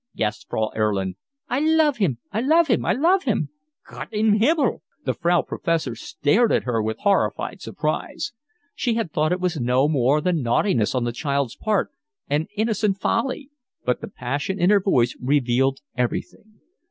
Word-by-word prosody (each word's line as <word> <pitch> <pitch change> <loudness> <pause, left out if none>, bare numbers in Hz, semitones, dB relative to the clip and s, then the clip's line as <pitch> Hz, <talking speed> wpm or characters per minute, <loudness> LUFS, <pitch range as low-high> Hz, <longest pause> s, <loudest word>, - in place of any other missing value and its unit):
gasped 105 -1 -2
Frau 110 0 -1
Erlin. 100 -4 0 0.3
"I 250 - 0
love 310 -2 +3
him. 175 - +1
I 220 - -1
love 320 +6 +4
him. 235 - +2
I 175 - +2
love 350 - +2
him." - - 0 0.4
"Gott - - -8
im 215 0 +2
Himmel!" 280 +1 +2 0.2
The 130 - +1
Frau 170 +5 +2
Professor 165 -7 -1
stared 215 - +1
at - - +2
her 120 -3 0
with 110 +1 -2
horrified 200 -1 0
surprise; - - -3 0.4
she 235 -3 -1
had 225 -8 -2
thought 155 +1 +1
it 180 - 0
was 180 -3 -1
no 125 +3 +3
more 140 -1 +2
than 175 -1 0
naughtiness 120 - +1
on 125 - +1
the 120 - -1
child's 140 0 -2
part, 215 -2 0 0.4
and 150 +3 0
innocent, 215 -2 0
folly. 265 +7 -1 0.3
but 125 - 0
the - - -5
passion 140 +10 -3
in 180 +3 +4
her 205 -1 +5
voice 125 -11 +2
revealed 135 0 +1
everything. 170 - -4
165 Hz, 170 wpm, -23 LUFS, -, 0.4 s, her